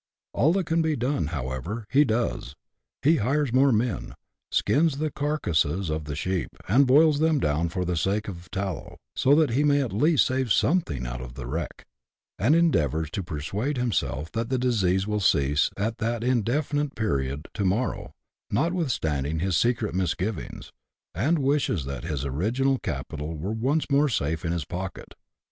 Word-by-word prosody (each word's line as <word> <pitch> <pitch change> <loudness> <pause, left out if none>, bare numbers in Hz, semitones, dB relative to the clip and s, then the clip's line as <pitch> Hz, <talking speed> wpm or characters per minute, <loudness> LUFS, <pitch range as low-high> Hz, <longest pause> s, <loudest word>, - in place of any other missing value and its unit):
All 155 - +3
that 190 -2 0
can 165 +1 +1
be 160 -1 +1
done, 125 - -1
however, 75 - -4
he 140 +3 +6
does: 110 - -2 0.5
he 155 +3 +5
hires 135 +3 0
more 135 +1 +5
men; 115 -2 -1 0.3
skins 150 -1 +2
the 155 0 -1
carcases 95 - 0
of 75 0 -3
the 75 -1 -4
sheep, 90 +2 -2 0.2
and 130 +7 +4
boils 150 +2 +5
them 160 0 +3
down 80 - 0
for 90 +2 -2
the 90 0 -1
sake 100 +6 0
of 90 -4 -6
the 90 - -20
tallow, 95 -3 -4 0.2
so 140 +2 +4
that 155 -4 +3
he 135 +5 +2
may 145 -1 +4
at 130 -8 -2
least 150 +8 +4
save 130 -3 -1
something 90 - +1
out - - -5
of - - -9
the 65 - -6
wreck; 75 +5 -5 0.5
and 125 +10 +4
endeavours 80 - +2
to 100 - -2
persuade 95 - -3
himself 95 - -1
that 115 0 -2
the 130 - +1
disease 100 -7 +1
will 105 0 -1
cease 75 -6 +2
at 110 +3 -2
that 115 0 -1
indefinite 135 +4 0
period 70 - -2
to 105 - -2
morrow, 100 +7 -1 0.4
notwithstanding 105 - 0
his 90 +2 0
secret 115 +2 +1
misgivings, 95 +3 -3 0.4
and 140 - +1
wishes 135 - +1
that 70 -2 -5
his 70 -2 -3
original 120 - 0
capital 75 +2 -5
were 90 +7 -3
once 130 +8 0
more 145 +1 +4
safe 80 - -1
in 80 - -1
his 85 -4 -2
pocket. 95 +1 -6
105 Hz, 170 wpm, -26 LUFS, -, 0.5 s, he